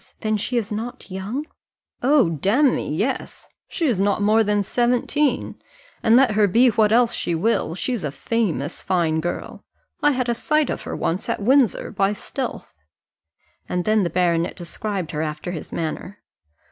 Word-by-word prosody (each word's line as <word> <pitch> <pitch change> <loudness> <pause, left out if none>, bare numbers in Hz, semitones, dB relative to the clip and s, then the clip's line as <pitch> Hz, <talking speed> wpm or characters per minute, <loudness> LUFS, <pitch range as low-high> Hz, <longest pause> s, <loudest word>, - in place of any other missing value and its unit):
then 215 0 0
she 240 +4 -1
is 220 -3 -2
not 220 -1 -5
young?" 205 +10 -4 0.6
"Oh, 265 - +4
damme, 205 - +2
yes, 215 - -3 0.2
she 340 - -2
is 230 -10 +1
not 200 +1 +2
more 215 +2 +4
than 205 -1 +1
seventeen, 250 +5 0 0.4
and, 225 - +4
let 260 -2 +5
her 210 0 +3
be 235 +7 +5
what 215 -1 +2
else 235 +1 +4
she 170 - -1
will, 170 -3 0
she's 240 +1 -2
a 150 - -1
famous 165 - -2
fine 165 -4 +1
girl. 175 +2 -5 0.4
I 295 0 +4
had 255 -1 -1
a 240 - +2
sight 305 +4 +1
of - - -4
her - - -3
once 175 +3 -2
at - - -1
Windsor, 255 +3 +2
by 195 +1 +1
stealth." 75 - -6 0.9
And 180 -1 -1
then 215 0 +3
the 175 - 0
baronet 170 0 +1
described 185 0 -4
her 155 -2 -2
after 155 +2 -4
his 165 -4 -7
manner. 170 +5 -5
210 Hz, 170 wpm, -22 LUFS, 175-245 Hz, 0.9 s, let